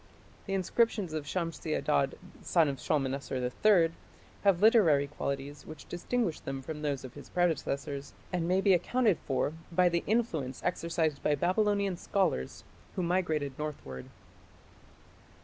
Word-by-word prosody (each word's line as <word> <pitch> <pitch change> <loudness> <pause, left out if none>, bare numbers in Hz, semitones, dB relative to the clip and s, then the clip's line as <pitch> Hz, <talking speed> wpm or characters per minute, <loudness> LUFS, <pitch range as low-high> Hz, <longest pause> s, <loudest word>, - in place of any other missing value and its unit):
The 195 - -1
inscriptions 195 -1 +1
of 155 -2 -3
Shamshi 165 -1 -2
Adad, 140 -2 +1 0.2
son 165 -3 +3
of 140 -1 -3
Shalmaneser 135 -2 -1 0.3
III, 180 -6 +6 0.5
have 195 -4 +4
literary 195 -10 +5
qualities 140 0 -4
which 155 -1 -10
distinguish 180 0 -1
them 135 0 -5
from 150 +2 -6
those 145 -3 -2
of 130 - -9
his 145 - -11
predecessors, 145 -5 -1 0.2
and 170 -2 0
may 185 +2 +3
be 195 -1 +5
accounted 210 +2 +2
for 140 +2 0 0.2
by 180 +1 +4
the 170 0 0
influence 165 - 0
exercised 165 -4 0
by 150 - +2
Babylonian 200 +3 +1
scholars 180 - -1 0.3
who 185 - -1
migrated 160 -6 0
northward. 105 - -6
165 Hz, 135 wpm, -31 LUFS, 140-185 Hz, 0.5 s, III